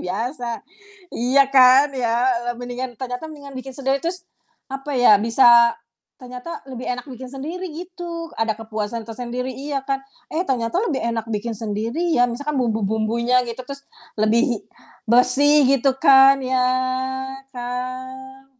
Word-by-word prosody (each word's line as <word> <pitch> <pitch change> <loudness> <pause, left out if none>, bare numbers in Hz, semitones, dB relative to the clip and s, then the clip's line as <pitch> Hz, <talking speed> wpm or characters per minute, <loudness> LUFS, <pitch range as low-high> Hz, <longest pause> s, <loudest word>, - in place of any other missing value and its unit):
Biasa. 235 +4 -4 0.6
Iya 265 +3 +3
kan, 265 +2 +6
ya, 240 +1 +1 0.2
le - - -1
mendingan 245 +1 -5
ternyata 250 +3 -5
mendingan 280 -3 -11
bikin 265 +1 -7
sendiri 270 0 0
terus, 350 +1 -3 0.5
apa 275 +2 -5
ya, 245 -4 +7
bisa 235 0 +5 0.5
ternyata 250 +6 -8
lebih 250 -1 -7
enak 250 0 -3
bikin 255 +1 -8
sendiri, 315 +8 -6
gitu, 340 -1 -7
ada 225 -1 0
kepuasan 220 0 -4
tersendiri, 245 +2 -5
iya 275 +1 -4
kan. 270 0 -2 0.3
Eh, 345 +4 -2
ternyata 250 +4 -1
lebih 285 -5 -2
enak 230 -1 -2
bikin 215 +2 -3
sendiri 230 - -2
ya, 245 - +4
misalkan 285 +5 -4
bumbu-bumbunya, 225 +2 +1
gitu, 235 +1 -6
terus 280 0 -8 0.4
lebih 225 +2 +2 0.4
bersih 265 +5 +4
gitu 270 0 +2
kan 275 -2 +7
ya, 255 -1 0 0.9
kan. 260 +2 -7
255 Hz, 135 wpm, -21 LUFS, 235-275 Hz, 0.9 s, ya